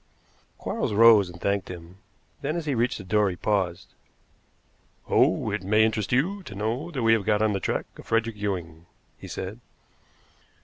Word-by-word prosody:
Quarles - - -2
rose, 110 -3 +7
and 85 -1 -11
thanked 100 0 -1
him; 90 +1 -10 0.4
then, 150 +3 -2
as 170 -2 -3
he 145 - 0
reached 120 0 0
the 105 - -8
door, 105 +2 +2
he 90 - -4
paused. 95 -3 -1 1.1
"Oh, - - +2
it - - -2
may 105 +3 +3
interest 110 -2 -1
you 175 +11 +1
to 105 - -10
know 115 - -2
that 135 -8 -3
we 115 0 +5
have 110 -3 +2
got 105 +1 +2
on 110 -1 +2
the 100 - -1
track - - -2
of - - -12
Frederick 115 0 0
Ewing," 90 -5 -4 0.3
he - - -9
said. 95 +5 -6
105 Hz, 180 wpm, -26 LUFS, 95-115 Hz, 1.1 s, rose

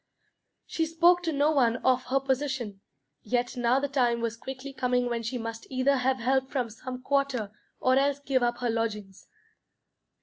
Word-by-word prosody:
She 325 -1 -1
spoke 345 +2 +4
to 335 -2 -1
no 290 +1 +2
one 245 -6 +3
of 255 0 +3
her 270 +2 +1
position. 265 -6 -2 0.4
Yet 245 +3 -1
now 245 +1 +2
the 285 - -1
time 245 -4 +1
was 230 -1 -2
quickly 265 +3 -8
coming 250 -1 +1
when 235 -1 -2
she 230 +3 -3
must 230 -1 -6
either 270 +1 +2
have 260 +1 +1
help 260 +2 +1
from 250 -5 -2
some 255 +3 -8
quarter 275 -7 0 0.3
or 255 0 +3
else 280 +1 +2
give 275 -2 0
up 240 0 +1
her 245 - 0
lodgings. 210 -4 -4
255 Hz, 175 wpm, -28 LUFS, 235-275 Hz, 0.4 s, spoke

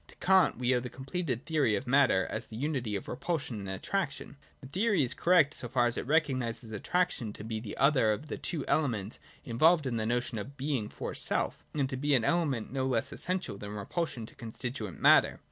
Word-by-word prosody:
To - - -16
Kant 190 0 +4
we 125 +1 +2
owe 125 - +3
the 125 +1 -6
completed 135 -1 -4
theory 150 -9 +2
of 130 - -3
matter 130 -7 +4
as 110 +1 -4
the 110 - -10
unity 125 -5 -2
of 100 - -5
repulsion 135 -4 -3
and 100 -1 -6
attraction. 145 - -3 0.2
The 135 - -12
theory 195 - +1
is 130 0 -1
correct, 165 -2 +4
so 120 - -5
far 120 0 +2
as 120 - +1
it - - -4
recognises 130 -7 0
attraction 120 - -1
to 105 - -8
be 110 0 -3
the 110 -2 -7
other 135 -5 +4
of 120 +8 -3
the - - -6
two 160 -6 -3
elements 115 -9 0 0.3
involved 155 +7 +4
in 120 -3 -1
the 110 0 -1
notion 120 -1 -1
of 135 +7 -8
Being 135 -6 -1
for - - -5
self: - - -1
and 140 -3 +1
to 130 -1 -4
be 145 +1 +2
an 120 - +2
element 140 -9 0
no 130 -1 0
less 120 -4 0
essential 180 - -3
than 105 0 -6
repulsion 120 - -3
to - - -14
constitute 115 - -6
matter. - - +5
130 Hz, 215 wpm, -30 LUFS, 115-150 Hz, 0.3 s, matter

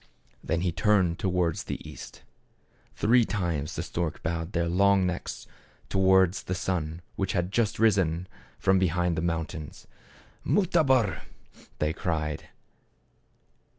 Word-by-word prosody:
Then 80 +1 -1
he 90 -1 +1
turned 95 -2 +2
towards 90 -3 0
the - - -6
east. - - -10 0.7
Three 120 +3 +4
times 85 -9 -2
the - - -2
storks 85 -2 -3
bowed 85 +1 -3
their 85 0 +1
long 100 +2 +3
necks 90 -1 -4 0.4
towards 95 0 +4
the 90 - -3
sun 90 -3 -3
which 95 -1 -1
had 90 +1 -1
just 110 -1 +1
risen 95 -6 +2 0.3
from 95 0 +3
be 95 - +3
hind 90 +1 0
the 80 - -1
mountains. 80 -2 -4 0.3
" - - -28
Mutabor! 150 - +2 0.3
" - - -23
they 75 +1 0
cried. 80 -3 -3
90 Hz, 135 wpm, -27 LUFS, 85-95 Hz, 0.7 s, Three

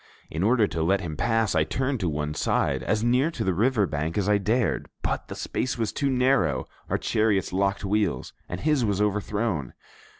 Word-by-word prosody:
In 80 - -3
order 110 +2 +4
to 80 -3 -3
let 95 +4 +2
him 80 -4 -5
pass, 115 +3 +1
I 80 -2 +3
turned 130 - -1
to 90 -4 0
one 75 0 -2
side, - - 0
as 110 0 0
near 125 +6 +3
to 170 - -4
the 95 - +1
river 110 +2 +2
brink 75 +1 -3
as 100 -1 0
I 105 0 +3
dared; 110 +4 0
but - - -2
the - - -7
space 130 - -2
was 110 -3 -1
too 140 - 0
narrow, 125 - +2 0.2
our - - +1
chariots 105 -4 +1
locked 100 +1 0
wheels, 100 -9 0 0.2
and 90 - -5
his 150 -4 +2
was 100 -3 0
overthrown. 105 - -1
105 Hz, 200 wpm, -26 LUFS, 85-120 Hz, 0.2 s, order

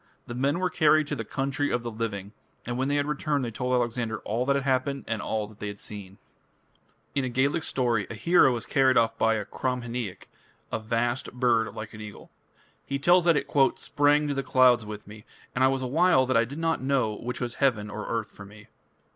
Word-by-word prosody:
The 120 - -7
men 135 +5 0
were 185 0 -1
carried 155 -1 +4
to 145 - -1
the 115 - -4
"Country 135 +4 -2
of 120 - -1
the 120 - -4
Living", 105 -3 -4 0.3
and 120 - -3
when 130 +2 0
they 145 +1 +1
returned 145 -1 -1
they 115 - -4
told 125 +3 -3
Alexander 120 -2 -1
"all 120 +4 -2
that 140 - +3
had 140 - 0
happened 135 +1 0
and 110 -2 -2
all 110 +1 -2
that 105 0 -16
they 105 - -4
had 100 0 -6
seen". 100 -2 -8 1.0
In 140 - 0
a 130 - -1
Gaelic 140 +6 +1
story 120 -9 0
a 115 - -6
hero 130 - +4
is 120 - -5
carried 130 -2 +3
off 115 -1 +3
by 115 0 +3
a 105 -2 -3
Cromhineach, 120 -5 -4 0.4
"a - - -1
vast 120 +3 -1
bird 120 -3 +1
like 110 +1 -7
an 105 - -9
eagle". 105 -1 -10 0.5
He 140 - -3
tells 175 +5 +4
that 170 -3 +5
it 140 - -1 0.3
"sprang 145 +1 +2
to 145 - -1
the 135 - -1
clouds 125 -4 +4
with 105 -1 -7
me, 105 +1 -12 0.3
and 125 - +1
I - - +7
was 135 0 0
a - - -1
while 155 +1 +3
that 130 - 0
I 115 0 +4
did 140 +5 -8
not 165 -2 0
know 130 -5 +1
which 120 +4 -5
was 120 -2 -3
heaven 110 -6 +1
or 105 +1 -6
earth 115 -2 -2
for 100 - -12
me". 105 +1 -15
125 Hz, 225 wpm, -27 LUFS, 110-140 Hz, 1.0 s, I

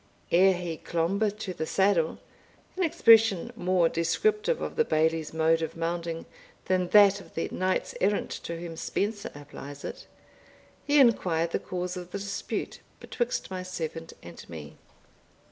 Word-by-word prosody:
Ere 190 +2 +6
he 175 -2 -4
"clombe 200 +5 0
to 195 -3 -5
the 160 - -4
saddle," 190 -5 +2 0.6
an 375 - -3
expression 225 - +5
more 180 -4 +2
descriptive 425 - +1
of - - -4
the 465 - +4
Bailie's 160 - +1
mode 160 +1 +2
of 160 - -4
mounting 165 0 -3 0.4
than 185 -1 +1
that 200 0 +6
of - - -17
the 165 - -1
knights 185 0 -1
errant 205 +2 +1
to 170 0 -5
whom 170 -1 -7
Spenser 205 +5 -2
applies 145 -1 -10
it, - - -7 0.8
he 295 0 +3
inquired 175 -10 +3
the - - 0
cause 180 0 -4
of 180 -1 -7
the 200 - -4
dispute 200 0 -4 0.2
betwixt 240 -5 -3
my 185 -1 -3
servant 165 -3 -5
and 85 -1 -11
me. 80 -2 -9
180 Hz, 150 wpm, -28 LUFS, 165-205 Hz, 0.8 s, Ere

